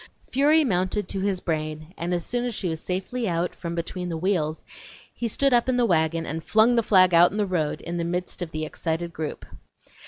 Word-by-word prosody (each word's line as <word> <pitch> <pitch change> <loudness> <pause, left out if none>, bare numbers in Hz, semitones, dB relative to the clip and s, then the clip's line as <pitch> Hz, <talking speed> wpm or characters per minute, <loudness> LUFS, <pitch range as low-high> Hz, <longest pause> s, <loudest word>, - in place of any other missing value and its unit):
Fury 295 +4 +4
mounted 190 -3 0
to 195 - -2
his 190 -1 -1
brain, 155 0 -3
and 170 +1 -3
as 175 -1 -1
soon 245 0 -1
as 240 -3 -3
she 190 - -2
was 160 -1 -3
safely 195 +5 -2
out 170 +1 -1
from 170 -1 -5
between 180 +1 -4
the 165 - -3
wheels 160 -3 -1 0.5
he 235 - -3
stood 275 +4 +2
up 240 +1 +3
in 250 - +2
the 245 - +3
wagon 165 -4 +1
and 160 +2 -4
flung 220 +6 +4
the 230 - +4
flag 185 -4 +5
out 170 +1 +7
in 205 - -6
the 210 - +2
road 170 -6 -1
in 170 0 -4
the 170 - -1
midst 180 +2 -3
of 175 - -3
the 155 -1 -3
excited 165 +2 -3
group. 155 -1 -5
180 Hz, 225 wpm, -25 LUFS, 165-215 Hz, 0.5 s, out